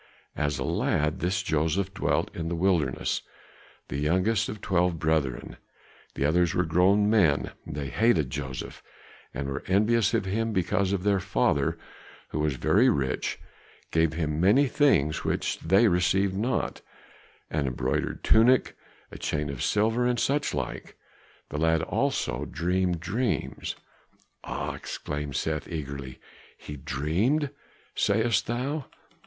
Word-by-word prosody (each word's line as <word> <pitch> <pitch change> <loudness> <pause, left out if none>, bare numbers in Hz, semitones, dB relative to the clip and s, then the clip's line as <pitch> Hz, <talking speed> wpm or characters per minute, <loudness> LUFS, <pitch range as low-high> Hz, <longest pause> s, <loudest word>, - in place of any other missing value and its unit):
As 75 -2 -1
a 65 - -2
lad 75 +2 0
this 95 +1 0
Joseph 80 +4 0
dwelt 100 - -1
in 80 -1 -3
the 85 - -2
wilderness, 85 -7 +1 0.7
the 70 - -4
youngest 95 +8 +1
of 105 - -6
twelve 90 -3 +1
brethren, 80 -5 -1 0.6
the 70 - 0
others 85 +3 +2
were 90 - +2
grown 95 +5 +3
men; 90 -10 +3 0.2
they 70 0 -4
hated 85 - +2
Joseph 65 -2 -5 0.5
and 70 +1 -4
were 70 - -3
envious 105 +3 +3
of 110 - 0
him 110 +4 -1
because 95 0 +1
their 100 0 +1
father, 70 -5 +1 0.5
who - - -3
was 75 -2 0
very 110 - +4
rich, 70 - -1 0.5
gave 80 -1 +2
him 80 -1 -1
many 105 +10 +5
things 100 - +2
which - - -1
they 95 +7 +4
received 95 +1 +2
not, 120 +6 -1 0.7
an 75 -3 0
embroidered 65 - -2
tunic, 120 +3 +4 0.4
a - - -9
chain 75 -1 -2
of 70 - -6
silver, 115 +4 +2
and 120 -1 +1
such 145 +2 +1
like. 65 -3 -5 0.5
The 75 - -4
lad 80 0 +2
also - - -1
dreamed 90 -1 -1
dreams 110 +6 -2 0.4
" - - -37
"Ah!" - - -4
exclaimed 75 -2 -5
Seth 75 +2 -2
eagerly, 70 -5 -6 0.4
"he 75 - -8
dreamed, 90 - 0 0.4
sayest 110 -1 +1
thou?" 130 +5 -2
90 Hz, 135 wpm, -27 LUFS, 75-105 Hz, 0.7 s, many